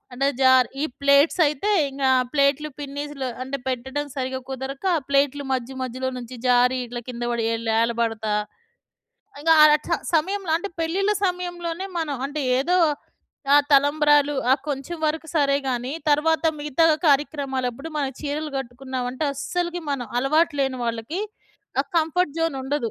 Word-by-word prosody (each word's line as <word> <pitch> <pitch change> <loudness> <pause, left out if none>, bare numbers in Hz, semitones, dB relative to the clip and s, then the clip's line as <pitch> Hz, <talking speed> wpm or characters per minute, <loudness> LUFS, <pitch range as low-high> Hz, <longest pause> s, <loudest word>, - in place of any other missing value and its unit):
అంటే 270 +2 0
జార్ 260 -1 +5
ఈ - - +2 0.2
ప్లేట్సయితే 290 +5 +3 0.2
ఇంగ 275 0 -5 0.3
ప్లేట్లు 280 +1 +2
పిన్నీస్లు 285 -1 -5 0.2
అంటే 270 +2 -3
పెట్టడం 265 +4 -3
సరిగ్గా 260 0 -3
కుదరక, 265 +4 -6
ఆ - - -5
ప్లేట్లు 280 0 +1
మధ్య, 260 0 -2
మధ్యలో 255 +1 -3
నుంచి 245 +1 -8
జారి, 250 +1 +4
ఇట్లా 240 0 -6
కింద 240 -1 -6
పడి 235 -1 -1
ఇట్లా 230 - +1
ఎల్ 225 0 -3
ఏలబడతా 225 -2 -1 1.1
ఇంగ 325 +2 +1
ఆ - - +10 0.2
చ - - -7 0.2
సమయంలో 370 +3 0
అంటే 400 +4 -4
పెళ్లిళ్ల 390 +6 +1
సమయంలోనే 355 0 -3
మనం 295 -4 -2
అంటే 295 +2 -4 0.2
ఏదో 350 +7 +2 0.8
ఆ - - +9 0.2
తలంబ్రాలు, 290 +1 +4 0.2
ఆ - - +8
కొంచెం 280 +4 -4
వరకు 320 +1 -2
సరేగాని, 275 -3 0 0.2
తరువాత 315 +3 +2 0.2
మిగతా 295 +2 +1 0.2
కార్యక్రమాలప్పుడు 275 -2 0
మనం 275 -2 -1
చీరలు 300 +1 -3
గట్టుకున్నాం 255 0 -5
అంటే, 280 +4 -3
అస్సలకి 345 +5 -3
మనం 265 -4 -2
అలవాటు 305 +5 +2
లేని 265 -1 0
వాళ్ళకి 230 - -3 0.6
ఆ - - -24
కంఫర్ట్ 325 -1 0
జోన్ 325 -4 0
ఉండదు. 265 -4 -2
280 Hz, 145 wpm, -23 LUFS, 260-310 Hz, 1.1 s, ఆ